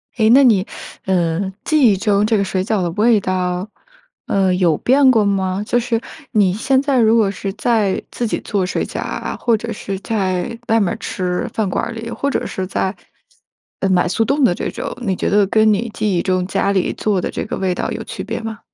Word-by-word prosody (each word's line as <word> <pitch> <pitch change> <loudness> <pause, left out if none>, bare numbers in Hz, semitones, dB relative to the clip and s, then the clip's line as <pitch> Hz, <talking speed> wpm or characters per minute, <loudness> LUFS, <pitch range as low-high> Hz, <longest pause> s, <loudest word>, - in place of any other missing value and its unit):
哎， 220 -2 +3
那 275 +1 +7
你 210 -6 +4 0.4
呃， 185 0 0
记 290 -8 +4
忆 - - +2
中 205 0 +2
这 220 0 +2
个 200 - +1
水 185 -1 -1
饺 210 -1 0
的 175 - 0
味 215 +3 +3
道， 185 +1 -2 0.6
呃， 190 -2 +2
有 175 -4 +3
变 265 +1 +4
过 220 -4 +3
吗？ 195 0 0
就 245 - +1
是 230 -1 -1 0.3
你 200 -5 +3
现 260 +5 +1
在 280 -3 +1
如 225 0 +4
果 215 -4 +3
是 195 -1 -4
在 220 -3 +1
自 240 - -3
己 220 - -1
做 195 -3 -1
水 - - -2
饺 - - -6
啊， - - -4
或 235 -2 +2
者 230 +2 -5
是 195 -2 -5
在 200 +1 -2
外 225 0 +4
面 195 - +1
儿 - - -3
吃 180 -1 -3
饭 215 -4 -1
馆 - - -1
儿 235 - -5
里， 230 0 -6
或 280 +3 -2
者 - - -1
是 190 - -4
在， 190 +1 -2 0.9
呃， 195 - +1
买 180 -1 +3
速 225 +5 +1
冻 280 +4 +1
的 175 -7 +4
这 - - -3
种， - - -5
你 195 -5 -1
觉 - - -1
得 205 0 +4
跟 215 +1 +4
你 225 +3 0
记 210 -5 0
忆 - - +1
中 185 -1 0
家 200 - 0
里 190 -2 0
做 200 -4 0
的 - - -2
这 - - -4
个 - - -4
味 185 -2 -1
道 - - -3
有 - - -4
区 - - -6
别 - - -4
吗？ 225 -1 -6
205 Hz, 245 characters per minute, -18 LUFS, 185-225 Hz, 0.9 s, 那